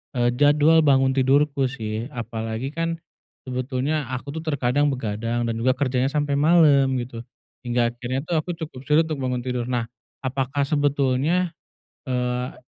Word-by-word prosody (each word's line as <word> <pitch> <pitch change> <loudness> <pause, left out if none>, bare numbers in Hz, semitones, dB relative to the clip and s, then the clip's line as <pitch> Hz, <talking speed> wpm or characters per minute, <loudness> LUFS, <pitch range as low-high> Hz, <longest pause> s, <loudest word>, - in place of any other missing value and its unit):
eee, 120 -1 +2
jadwal 145 +3 +5
bangun 135 -2 +4
tidurku 140 +1 +3
sih 110 -2 -4
apalagi 115 +1 -4
kan 165 +1 -2 0.4
sebetulnya 130 +3 -2
aku 130 +2 -5
tuh 160 - -5
terkadang 145 -2 +1
begadang 115 -2 -2
dan 115 -1 -1
juga 130 +3 +3
kerjanya 130 -1 0
sampai 145 -1 0
malam, 145 -4 +5
gitu. 120 -1 -6 0.4
Hingga 120 -1 +1
akhirnya 125 +2 -3
tuh 175 - -1
aku 165 +3 -4
cukup 160 -5 -7
sulit 150 +2 +5
untuk 155 -3 -3
bangun 125 -1 -1
tidur. 125 -1 -2
Nah, 120 -2 0 0.4
apakah 135 +1 -1
sebetulnya, 145 +4 +1 0.6
eee, 125 0 -2
130 Hz, 145 wpm, -23 LUFS, 125-145 Hz, 0.6 s, jadwal